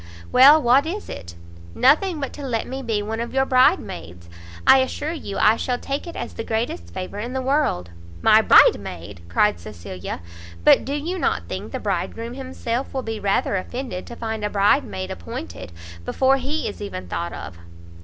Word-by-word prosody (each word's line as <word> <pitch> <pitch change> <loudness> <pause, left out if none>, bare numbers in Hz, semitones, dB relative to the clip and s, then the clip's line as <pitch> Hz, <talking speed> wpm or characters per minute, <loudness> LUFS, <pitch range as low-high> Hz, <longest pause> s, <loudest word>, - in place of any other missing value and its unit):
"Well, 280 +5 +8
what 270 +2 +4
is 405 +5 -5
it?" 85 -1 -8 0.4
"Nothing 315 +5 +3
but 275 - -4
to - - -9
let 240 -5 -2
me 265 +1 -5
be 225 -5 -1
one 220 +2 -4
of 235 +2 -4
your 265 0 +3
bride 255 -1 +5
maids. 85 0 -10 0.3
I 265 - +8
assure 290 +4 -2
you 290 -12 -6
I 215 +2 +4
shall 250 -1 -1
take 275 +6 -4
it 340 - -8
as - - -5
the - - -5
greatest 220 - -3
favour 185 - -6
in 240 +4 -4
the 265 - -1
world." 255 - 0 0.3
"My - - +7
bride - - +7
maid!" 90 +1 -9
cried 210 - +2
Cecilia; 90 -3 -7 0.4
"but - - +6
do 275 - -3
you 340 +6 -3
not - - 0
think - - -6
the - - -4
bridegroom 230 +1 -3
himself 260 -1 -4
will 260 - -1
be 225 -1 -4
rather 200 0 +1
offended 235 -1 -5
to 235 - -8
find 220 -2 -4
a 210 - 0
bridesmaid 105 - +1
appointed, 85 0 -7 0.3
before 265 - +2
he 285 +4 -2
is 205 - -7
even 145 - -6
thought 85 0 -3
of?" 85 0 -8
230 Hz, 190 wpm, -22 LUFS, -, 0.4 s, Well